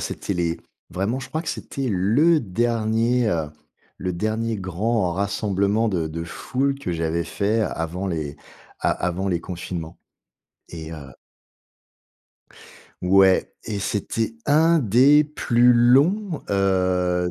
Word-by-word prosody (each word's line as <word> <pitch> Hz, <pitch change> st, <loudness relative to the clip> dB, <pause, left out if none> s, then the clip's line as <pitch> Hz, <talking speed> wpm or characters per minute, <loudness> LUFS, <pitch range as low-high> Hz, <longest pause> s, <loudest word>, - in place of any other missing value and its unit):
C'était 100 Hz, -, -4 dB
les 85 Hz, -1 st, -1 dB, 0.3 s
vraiment, 100 Hz, +8 st, -2 dB
je 130 Hz, -, -8 dB
crois, 155 Hz, +4 st, -3 dB
que -, -, -6 dB
c'était 135 Hz, -2 st, -4 dB
le 125 Hz, -, +3 dB
dernier, 115 Hz, +2 st, 0 dB
heu, 80 Hz, -5 st, -1 dB, 0.5 s
le 90 Hz, -1 st, -3 dB
dernier 110 Hz, +4 st, -2 dB
grand 95 Hz, +1 st, -1 dB
rassemblement 100 Hz, +2 st, 0 dB
de 85 Hz, -6 st, -1 dB
de 85 Hz, +1 st, -5 dB
foule 135 Hz, +9 st, -2 dB
que 135 Hz, -, -4 dB
j'avais 85 Hz, 0 st, -1 dB
fait 105 Hz, +6 st, 0 dB
avant 90 Hz, -2 st, -3 dB
les 75 Hz, -5 st, -3 dB, 0.4 s
a -, -, +1 dB
avant 90 Hz, +2 st, -2 dB
les 85 Hz, -2 st, 0 dB
confinements. 85 Hz, -2 st, -6 dB, 0.7 s
Et 80 Hz, -1 st, -8 dB
heu 70 Hz, -5 st, -9 dB, 1.9 s
Ouais, 95 Hz, +1 st, +4 dB
et 105 Hz, -2 st, -4 dB
c'était 110 Hz, +3 st, -2 dB
un 160 Hz, +3 st, +4 dB
des 135 Hz, +5 st, +5 dB
plus 125 Hz, -4 st, +3 dB
longs, 145 Hz, -, +3 dB
heu, 90 Hz, -2 st, +1 dB
100 Hz, 125 wpm, -23 LUFS, 90-120 Hz, 1.9 s, des